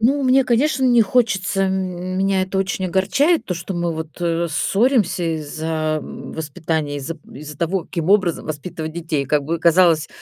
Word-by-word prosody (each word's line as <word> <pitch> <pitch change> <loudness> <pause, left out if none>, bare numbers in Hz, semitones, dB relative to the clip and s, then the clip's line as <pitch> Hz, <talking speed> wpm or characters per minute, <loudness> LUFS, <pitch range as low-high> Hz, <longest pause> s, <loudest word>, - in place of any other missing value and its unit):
Ну, 275 +5 +2
мне, 260 +1 +4
конечно, 265 +3 +2
не 240 -2 +5
хочется, 200 -4 +1
м 185 -1 -2
меня 195 -1 +2
это 190 +1 -2
очень 190 0 -1
огорчает, 230 - +2
то, 180 - -2
что 175 +3 -5
мы 170 -1 -1
вот, 160 +1 -7
э, 170 0 0
ссоримся 200 - +1 0.2
из-за 155 +1 -2
м - - -9
воспитания, 155 -1 -3
из-за 145 +4 -5 0.2
из-за 150 +2 -9
того, 170 +2 -1
каким 170 +1 -3
образом 185 -5 +2
воспитывать 155 +1 -5
детей. 160 -4 -2
Как 145 +1 +1
бы 165 +3 -2
казалось, 165 -2 +4
175 Hz, 170 wpm, -20 LUFS, 160-195 Hz, 0.2 s, не